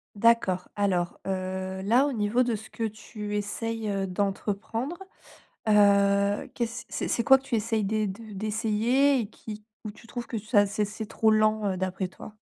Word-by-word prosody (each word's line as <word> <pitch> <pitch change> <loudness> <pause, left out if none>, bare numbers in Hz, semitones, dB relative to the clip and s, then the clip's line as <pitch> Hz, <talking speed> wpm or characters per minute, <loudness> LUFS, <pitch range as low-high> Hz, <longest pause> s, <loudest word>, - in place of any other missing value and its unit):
D'accord. 205 -4 +3
Alors, 185 -4 0
heu, 190 0 -3
là, 245 +8 +4
au - - -1
niveau 215 +3 +1
de 235 -2 0
ce 220 +1 -9
que 230 - -5
tu 210 -1 -4
essayes, 220 +1 -3
heu, 195 -1 -1
d'entreprendre, 205 - -2 0.7
heu, 200 -1 +4
qu'est-ce 235 0 -3
c'est - - -3
c'est 235 - +1
quoi 265 +2 +7
que 265 - -19
tu 270 - -3
essayes 220 -1 0
d'é 215 +1 0
de 215 +3 -8
d'essayer 225 +6 +2
et 215 -1 -5
qui 215 -1 -9 0.2
ou 210 - -5
tu 230 - -17
trouves 240 0 -5
que 225 - -3
ça 205 -1 +3
c'est 210 +1 -1
c'est 215 +1 -6
trop 220 0 +2
lent, 215 -1 +3
heu, - - -5
d'après 185 0 -2
toi? 210 +3 -12
215 Hz, 180 wpm, -27 LUFS, 200-230 Hz, 0.7 s, quoi